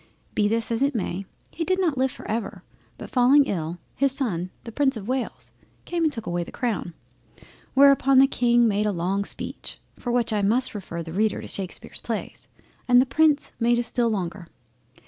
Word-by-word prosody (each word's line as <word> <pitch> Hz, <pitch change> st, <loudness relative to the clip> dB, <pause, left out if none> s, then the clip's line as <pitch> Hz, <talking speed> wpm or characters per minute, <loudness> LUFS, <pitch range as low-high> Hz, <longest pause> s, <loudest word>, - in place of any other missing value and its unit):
Be 210 Hz, -, +2 dB
this 225 Hz, +2 st, 0 dB
as 230 Hz, +2 st, 0 dB
it 280 Hz, 0 st, +2 dB
may, 195 Hz, -2 st, -3 dB, 0.2 s
he 330 Hz, -, -3 dB
did 370 Hz, +3 st, 0 dB
not 340 Hz, -6 st, +1 dB
live 265 Hz, 0 st, +1 dB
for -, -, -11 dB
ever, 225 Hz, +1 st, -3 dB, 0.3 s
but -, -, -9 dB
falling 275 Hz, +2 st, +5 dB
ill, 170 Hz, -6 st, -3 dB, 0.2 s
his 275 Hz, 0 st, +2 dB
son 195 Hz, -10 st, -2 dB
the 230 Hz, -, -8 dB
Prince 265 Hz, 0 st, +1 dB
of 205 Hz, -1 st, -8 dB
Wales 255 Hz, 0 st, -3 dB, 0.3 s
came 345 Hz, -1 st, -1 dB
and 315 Hz, -, +3 dB
took 225 Hz, -5 st, -5 dB
away 175 Hz, -2 st, -1 dB
the -, -, -11 dB
crown; 210 Hz, -8 st, -3 dB, 0.8 s
whereupon 275 Hz, -1 st, +6 dB
the 265 Hz, -, +8 dB
King 240 Hz, -3 st, +3 dB
made 210 Hz, 0 st, +1 dB
a -, -, +1 dB
long 190 Hz, +2 st, -1 dB
speech, -, -, -4 dB, 0.2 s
for 245 Hz, -, -4 dB
which 235 Hz, -2 st, +1 dB
I 210 Hz, -, +1 dB
must 235 Hz, +6 st, +2 dB
refer 175 Hz, -5 st, -6 dB
the 165 Hz, 0 st, -8 dB
Reader 215 Hz, +3 st, +1 dB
to -, -, -8 dB
Shakespear's 190 Hz, -2 st, -5 dB
Plays, -, -, -5 dB, 0.4 s
and 245 Hz, -1 st, +6 dB
the 255 Hz, -, +4 dB
Prince 300 Hz, +1 st, +2 dB
made 235 Hz, 0 st, +3 dB
a 240 Hz, -, +1 dB
still 235 Hz, 0 st, 0 dB
longer. 185 Hz, -3 st, -3 dB
235 Hz, 200 wpm, -24 LUFS, 200-265 Hz, 0.8 s, the